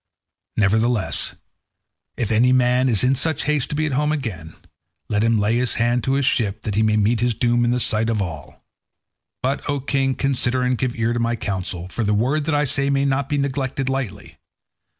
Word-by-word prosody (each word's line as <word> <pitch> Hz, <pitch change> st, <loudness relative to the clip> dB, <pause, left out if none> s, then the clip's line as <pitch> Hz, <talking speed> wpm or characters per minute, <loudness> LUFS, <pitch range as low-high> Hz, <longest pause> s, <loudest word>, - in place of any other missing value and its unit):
Nevertheless, 110 Hz, +1 st, +1 dB, 0.8 s
if 115 Hz, -3 st, -2 dB
any 120 Hz, +3 st, +4 dB
man 130 Hz, 0 st, +3 dB
is 110 Hz, -5 st, +3 dB
in 130 Hz, +1 st, +3 dB
such 145 Hz, +3 st, 0 dB
haste 150 Hz, -3 st, 0 dB
to -, -, -3 dB
be 155 Hz, +1 st, 0 dB
at 155 Hz, -, -2 dB
home 150 Hz, +3 st, +1 dB
again, 95 Hz, -, -5 dB, 0.5 s
let 105 Hz, 0 st, +1 dB
him 115 Hz, 0 st, +3 dB
lay 105 Hz, +3 st, +1 dB
his 125 Hz, 0 st, +1 dB
hand 120 Hz, +1 st, +1 dB
to 135 Hz, -, +1 dB
his 140 Hz, 0 st, +1 dB
ship 105 Hz, -4 st, 0 dB
that 105 Hz, -, -3 dB
he 105 Hz, -, +1 dB
may 110 Hz, 0 st, +2 dB
meet 110 Hz, +2 st, +2 dB
his 120 Hz, -1 st, 0 dB
doom 120 Hz, +1 st, +1 dB
in 120 Hz, -, +2 dB
the 125 Hz, +1 st, +1 dB
sight 110 Hz, -1 st, 0 dB
of 110 Hz, -2 st, 0 dB
all. 80 Hz, -6 st, -6 dB, 0.8 s
But, 135 Hz, +3 st, -1 dB
O 145 Hz, -1 st, 0 dB
king, 135 Hz, -1 st, 0 dB
consider 130 Hz, -2 st, +1 dB
and 125 Hz, 0 st, +1 dB
give 125 Hz, 0 st, -2 dB
ear 115 Hz, 0 st, 0 dB
to 120 Hz, -, -1 dB
my 115 Hz, 0 st, 0 dB
counsel, 95 Hz, -4 st, -4 dB
for 115 Hz, +5 st, -3 dB
the 105 Hz, 0 st, +1 dB
word 135 Hz, +8 st, 0 dB
that 160 Hz, -1 st, 0 dB
I 145 Hz, 0 st, +2 dB
say 140 Hz, 0 st, +1 dB
may 140 Hz, 0 st, +1 dB
not 140 Hz, 0 st, 0 dB
be 145 Hz, -, 0 dB
neglected 135 Hz, -1 st, -2 dB
lightly. 135 Hz, -6 st, -5 dB
120 Hz, 210 wpm, -21 LUFS, 110-135 Hz, 0.8 s, any